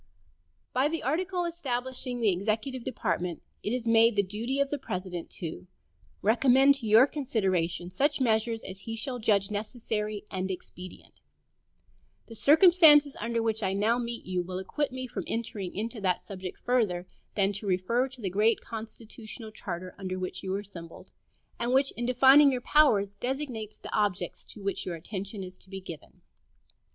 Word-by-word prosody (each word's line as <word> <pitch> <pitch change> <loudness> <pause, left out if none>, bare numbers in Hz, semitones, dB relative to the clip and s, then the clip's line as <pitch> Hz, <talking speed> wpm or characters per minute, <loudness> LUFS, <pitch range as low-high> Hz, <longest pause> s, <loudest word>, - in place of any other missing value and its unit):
By 260 +3 +3
the 325 +2 -3
article 355 +6 0
establishing 255 -6 -3
the 215 -3 +4
executive 220 +7 -2
department 180 -8 -2 0.2
it 210 - -2
is 245 -1 -2
made 230 0 +5
the 200 - +3
duty 225 +8 -3
of 280 -1 +1
the 290 - -1
President 185 -7 -5
"to 170 +1 -6 0.6
recommend 260 +5 +5
to 230 - -5
your 220 +4 +7
consideration 190 - -1
such 285 +11 +1
measures 225 -2 +1
as 190 0 -7
he 225 +3 -5
shall 245 +2 -3
judge 205 -3 +2
necessary 210 -1 -3
and 190 0 -2
expedient." 185 0 -9 1.1
The 230 - -11
circumstances 300 - +6
under 230 0 -1
which 220 -1 0
I 190 -2 0
now 220 +5 +2
meet 235 -1 -5
you 180 -1 -1
will 180 +1 -5
acquit 270 +10 -2
me 255 0 -5
from 250 - -5
entering 210 -5 -3
into 225 +2 -4
that 185 -2 +1
subject 190 -3 -7
further 215 -8 0 0.3
than 200 -1 +2
to 205 +1 -5
refer 195 +8 +1
to 260 -2 -11
the 195 - -1
great 215 +4 +3
constitutional 225 0 -8
charter 185 -3 -6
under 185 -1 -4
which 185 0 -4
you 190 - -4
are 200 - -2
assembled, 170 -5 -11 0.5
and 240 +1 0
which, 270 +1 +3
in 240 0 -4
defining 270 +3 +7
your 250 -1 -2
powers, 210 -10 +3
designates 245 -4 -4
the - - -9
objects 205 -3 -1
to 210 - -12
which 200 0 -1
your 180 - -4
attention 195 +4 -6
is 185 0 -10
to - - -15
be 195 0 -6
given. 170 -5 -11
220 Hz, 170 wpm, -28 LUFS, 190-255 Hz, 1.1 s, your